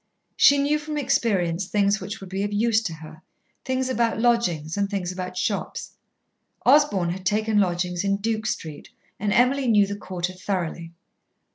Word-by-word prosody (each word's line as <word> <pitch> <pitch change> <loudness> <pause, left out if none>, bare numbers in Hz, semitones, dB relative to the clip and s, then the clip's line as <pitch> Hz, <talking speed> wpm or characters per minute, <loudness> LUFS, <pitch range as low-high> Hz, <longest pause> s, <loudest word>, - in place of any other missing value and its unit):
She 285 - +6
knew 290 +2 +1
from 300 0 -5
experience 200 - 0
things 205 +1 +1
which 205 - -6
would 195 - -10
be 190 +1 -2
of 205 +1 -2
use 220 +1 +2
to 165 - -2
her 155 0 -12 0.4
things 260 0 -1
about 235 -3 0
lodgings 180 -10 +1
and 200 -1 0
things 190 -3 -2
about 185 0 -6
shops. 200 +2 -3 0.7
Osborn 250 - +4
had 185 +1 -6
taken 215 +2 +1
lodgings 180 -1 0
in 200 0 +1
Duke 220 +1 -2
Street, 155 -7 -5 0.3
and 205 +1 -1
Emily 255 +4 +3
knew 210 -3 +5
the 200 +1 -4
quarter 185 -2 -4
thoroughly. 175 -3 -4
200 Hz, 165 wpm, -24 LUFS, 180-235 Hz, 0.7 s, She